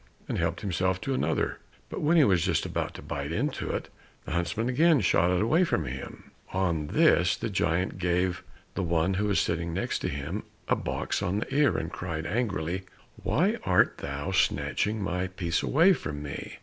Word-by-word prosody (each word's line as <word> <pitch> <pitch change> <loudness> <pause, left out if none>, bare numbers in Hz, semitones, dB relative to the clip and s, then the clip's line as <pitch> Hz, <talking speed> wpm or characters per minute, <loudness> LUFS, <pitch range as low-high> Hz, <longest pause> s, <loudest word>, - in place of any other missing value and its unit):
and - - -2
helped 85 0 -1
himself 95 -1 0
to 135 - -2
another. 130 - 0 0.3
But - - -5
when 160 +3 +3
he 155 - +7
was 90 -9 +3
just 90 -5 +1
about - - -3
to - - -9
bite 70 +1 -4
into 135 - -2
it, - - -3 0.4
the - - -6
huntsman 90 +8 -1
again 150 +2 +4
shot 85 -2 +3
it 90 +3 +2
away 160 +11 +4
from 175 - 0
him. 65 +2 -8 0.2
On 85 -5 0
this - - +4
the - - -3
giant 90 +3 0
gave 90 +1 0 0.3
the - - -2
one 85 +1 +1
who 100 +2 0
was 100 -2 +2
sitting 85 0 -1
next 95 - -1
him 75 +9 -3 0.3
a - - +3
box - - -2
on 90 +3 0
the 105 - -3
ear, 145 0 +4
and 80 +2 -3
cried 85 -3 -4
angrily, 95 -4 -1 0.4
"Why - - +1
art - - +3
thou 70 +6 -4
snatching 105 +2 +1
my 90 -1 -1
piece 90 -2 -1
away 170 +7 +5
from 75 - -5
me?" 70 -2 -6
90 Hz, 190 wpm, -28 LUFS, 85-105 Hz, 0.4 s, he